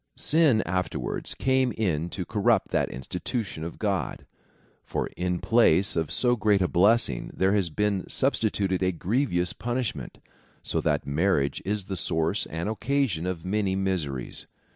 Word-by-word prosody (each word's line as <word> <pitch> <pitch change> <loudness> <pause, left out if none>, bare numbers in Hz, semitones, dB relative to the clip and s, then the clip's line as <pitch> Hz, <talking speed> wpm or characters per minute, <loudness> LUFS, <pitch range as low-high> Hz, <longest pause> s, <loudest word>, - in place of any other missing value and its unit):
Sin 150 -8 +4
afterwards 90 0 -1
came 130 -1 +2
in 85 -6 -1
to 90 0 -4
corrupt 110 +1 +1
that - - 0
institution 80 - -4
of 85 - -6
God; 100 -4 -2 0.6
for - - -2
in 90 0 -1
place 100 -3 +3
of 80 -3 -1
so 120 +10 +3
great 105 -3 +2
a 90 - +2
blessing 95 - +2
there 95 +1 +2
has 100 -5 +1
been 100 +3 -1
sub 135 +2 +2
stituted 100 -4 0
a 95 0 +2
grievous 90 - 0
punishment, 120 -1 -3 0.5
so - - -1
that - - 0
marriage 70 -2 +1
is 100 0 -2
the 95 - -4
source 80 +2 0
and 80 +4 -4
occasion 110 - 0
of 90 -2 -4
many 95 0 0
miseries. 85 -10 -2
95 Hz, 150 wpm, -26 LUFS, 85-110 Hz, 0.6 s, Sin